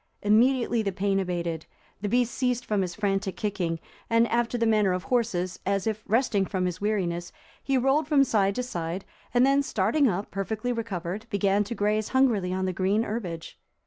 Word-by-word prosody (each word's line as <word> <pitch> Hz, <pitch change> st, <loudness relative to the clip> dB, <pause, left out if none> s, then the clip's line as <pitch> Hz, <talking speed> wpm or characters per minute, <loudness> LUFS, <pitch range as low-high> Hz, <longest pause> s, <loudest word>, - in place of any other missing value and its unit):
Immediately 235 Hz, +2 st, +3 dB
the 200 Hz, -2 st, -1 dB
pain 195 Hz, +1 st, 0 dB
abated, 170 Hz, -3 st, -3 dB, 0.3 s
the 205 Hz, -, -2 dB
beast 245 Hz, +1 st, +1 dB
ceased 250 Hz, -2 st, 0 dB
from 210 Hz, -2 st, 0 dB
his 180 Hz, -2 st, -3 dB
frantic 195 Hz, -2 st, -1 dB
kicking, 180 Hz, -6 st, -2 dB, 0.3 s
and, 230 Hz, 0 st, +4 dB
after 240 Hz, +1 st, 0 dB
the 230 Hz, -, +1 dB
manner 210 Hz, -4 st, +3 dB
of 180 Hz, 0 st, -2 dB
horses, 205 Hz, -8 st, -1 dB
as 195 Hz, 0 st, 0 dB
if 215 Hz, -1 st, -2 dB
resting 225 Hz, -3 st, +2 dB
from 185 Hz, -2 st, -1 dB
his 180 Hz, +1 st, -3 dB
weariness, 180 Hz, -5 st, -1 dB, 0.3 s
he 270 Hz, -1 st, +1 dB
rolled 270 Hz, +4 st, +2 dB
from 290 Hz, -3 st, +5 dB
side 200 Hz, -6 st, +1 dB
to 250 Hz, -, -1 dB
side, 175 Hz, -5 st, -4 dB, 0.3 s
and 245 Hz, +1 st, +4 dB
then 275 Hz, +1 st, +4 dB
starting 265 Hz, +3 st, +2 dB
up, 195 Hz, +1 st, -3 dB
perfectly 215 Hz, +5 st, -2 dB
recovered, 210 Hz, -2 st, -4 dB
began 200 Hz, 0 st, +2 dB
to 235 Hz, -, -5 dB
graze 210 Hz, +1 st, 0 dB
hungrily 235 Hz, -9 st, +2 dB
on 185 Hz, 0 st, -1 dB
the 185 Hz, -, -1 dB
green 195 Hz, +5 st, +1 dB
herbage. 185 Hz, -8 st, -5 dB
205 Hz, 185 wpm, -27 LUFS, 185-235 Hz, 0.3 s, from